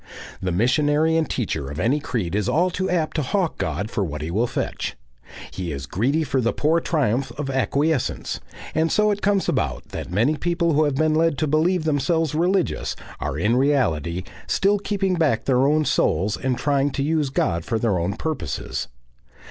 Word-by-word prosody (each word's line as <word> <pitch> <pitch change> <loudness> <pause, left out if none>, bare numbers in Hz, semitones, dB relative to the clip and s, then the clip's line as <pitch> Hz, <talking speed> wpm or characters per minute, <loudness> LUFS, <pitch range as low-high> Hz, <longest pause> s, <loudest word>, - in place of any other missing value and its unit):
The 95 -1 -1
missionary 145 - +2
and 165 -1 +1
teacher 80 - -2
of 70 +2 -6
any 135 - +2
creed 110 - -3
is 105 +3 0
all 175 +8 +2
too 185 +1 -2
apt 165 -3 0
to - - +2
hawk 175 +5 -1
God 90 +8 -2
for 105 - 0
what 75 -4 -4
he 80 - -4
will 115 +7 +1
fetch; - - -3 0.6
he 90 -3 -4
is 70 -1 -5
greedy 130 - 0
for 130 -2 0
the 115 - +1
poor 160 +3 +2
triumph 135 -6 0
of 140 -2 -3
acquiescence; 140 +2 0 0.3
and 160 +1 +1
so 210 0 +3
it 205 0 -2
comes 200 -1 +2
about - - -1
that - - -6
many 120 +11 +2
people 170 0 +1
who 155 +1 +3
have 145 -2 0
been 155 +2 +2
led 160 -2 +2
to 155 - +1
believe 160 +4 +2
themselves 160 +1 +1
religious, 180 +3 0 0.2
are 65 - -3
in 105 +9 +2
reality 90 - +1 0.2
still 200 +1 +2
keeping 195 -2 0
back 145 -9 +1
their 130 0 +3
own 155 +1 +2
souls 100 - +1
and 130 -2 -1
trying 140 +1 +1
to 140 - -1
use 150 -1 +1
God 85 - 0
for 115 - -1
their 110 -5 +1
own 90 +4 -1
purposes. 160 -1 -3
140 Hz, 190 wpm, -23 LUFS, 110-160 Hz, 0.6 s, so